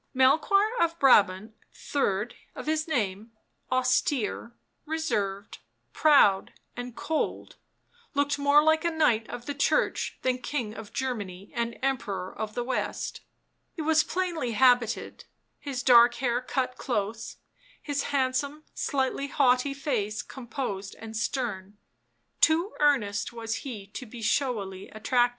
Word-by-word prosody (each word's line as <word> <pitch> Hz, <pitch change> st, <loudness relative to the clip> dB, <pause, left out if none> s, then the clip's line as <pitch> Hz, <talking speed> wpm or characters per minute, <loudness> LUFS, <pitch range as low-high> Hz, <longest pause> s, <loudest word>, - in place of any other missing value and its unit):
Melchoir 320 Hz, -, +4 dB
of 335 Hz, 0 st, +1 dB
Brabant, 215 Hz, -, +4 dB, 0.2 s
third 215 Hz, -5 st, -1 dB, 0.2 s
of -, -, -7 dB
his 310 Hz, +1 st, 0 dB
name, 220 Hz, -6 st, -2 dB, 0.4 s
austere, 255 Hz, -, +1 dB, 0.4 s
reserved, 210 Hz, -11 st, -2 dB, 0.3 s
proud 275 Hz, -11 st, +4 dB, 0.2 s
and 245 Hz, -1 st, -6 dB
cold, 320 Hz, -1 st, -3 dB, 0.6 s
looked 285 Hz, 0 st, +1 dB
more 285 Hz, +1 st, +5 dB
like 315 Hz, +1 st, +3 dB
a 340 Hz, -, +2 dB
knight 250 Hz, -9 st, +2 dB
of 245 Hz, 0 st, -7 dB
the 285 Hz, -, -3 dB
Church 285 Hz, -, 0 dB
than 255 Hz, -1 st, +1 dB
King 245 Hz, -4 st, -3 dB
of 220 Hz, -2 st, -9 dB
Germany 205 Hz, -8 st, -4 dB
and 235 Hz, 0 st, -2 dB
Emperor 220 Hz, -9 st, -2 dB
of 215 Hz, -1 st, -5 dB
the 245 Hz, -, -1 dB
West; 255 Hz, -, -3 dB, 0.5 s
he 320 Hz, -, -4 dB
was 315 Hz, 0 st, +4 dB
plainly 335 Hz, -8 st, -2 dB
habited, 245 Hz, -1 st, +2 dB, 0.3 s
his 270 Hz, -3 st, -4 dB
dark 240 Hz, -2 st, +7 dB
hair 245 Hz, -1 st, 0 dB
cut 255 Hz, 0 st, -2 dB
close, 220 Hz, -2 st, -3 dB, 0.4 s
his 285 Hz, -2 st, -2 dB
handsome, 280 Hz, +2 st, -1 dB
slightly 275 Hz, 0 st, -1 dB
haughty 270 Hz, 0 st, +2 dB
face 225 Hz, -7 st, -2 dB
composed 235 Hz, -6 st, -5 dB
and 225 Hz, 0 st, -9 dB
stern; 215 Hz, -4 st, -3 dB, 0.6 s
too 335 Hz, +6 st, +3 dB
earnest 250 Hz, -9 st, +2 dB
was 225 Hz, -1 st, -3 dB
he 225 Hz, -8 st, -7 dB
to 220 Hz, +5 st, -9 dB
be 230 Hz, +1 st, -9 dB
showily 215 Hz, -6 st, -1 dB
attractive. 240 Hz, +3 st, +2 dB
250 Hz, 130 wpm, -27 LUFS, 220-285 Hz, 0.6 s, dark